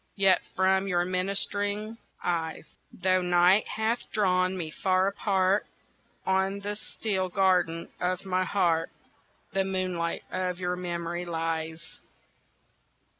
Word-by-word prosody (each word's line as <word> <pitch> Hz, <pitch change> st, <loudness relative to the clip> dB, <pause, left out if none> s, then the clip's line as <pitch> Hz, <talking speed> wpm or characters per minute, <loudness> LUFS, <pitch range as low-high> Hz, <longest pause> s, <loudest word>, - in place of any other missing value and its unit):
Yet 195 Hz, -2 st, +4 dB
from 190 Hz, +1 st, +2 dB
your 175 Hz, -2 st, +1 dB
ministering 200 Hz, +4 st, 0 dB, 0.2 s
eyes 165 Hz, -2 st, -3 dB, 0.2 s
Though 185 Hz, 0 st, +1 dB
night 180 Hz, +3 st, +4 dB
hath 220 Hz, +2 st, 0 dB
drawn 185 Hz, -3 st, +2 dB
me 160 Hz, -3 st, -4 dB
far 185 Hz, +2 st, +1 dB
apart 195 Hz, 0 st, +1 dB, 0.6 s
On 190 Hz, +1 st, +1 dB
the 205 Hz, +1 st, -3 dB
still 195 Hz, -3 st, -2 dB
garden 180 Hz, -3 st, +2 dB
of 180 Hz, +1 st, -1 dB
my 185 Hz, -1 st, +1 dB
heart 170 Hz, -4 st, +1 dB, 0.6 s
The 195 Hz, 0 st, +2 dB
moonlight 185 Hz, -3 st, -2 dB
of 185 Hz, -1 st, -2 dB
your 180 Hz, 0 st, -1 dB
memory 175 Hz, -1 st, -3 dB
lies. 165 Hz, -1 st, -4 dB
185 Hz, 115 wpm, -28 LUFS, 175-195 Hz, 0.6 s, Yet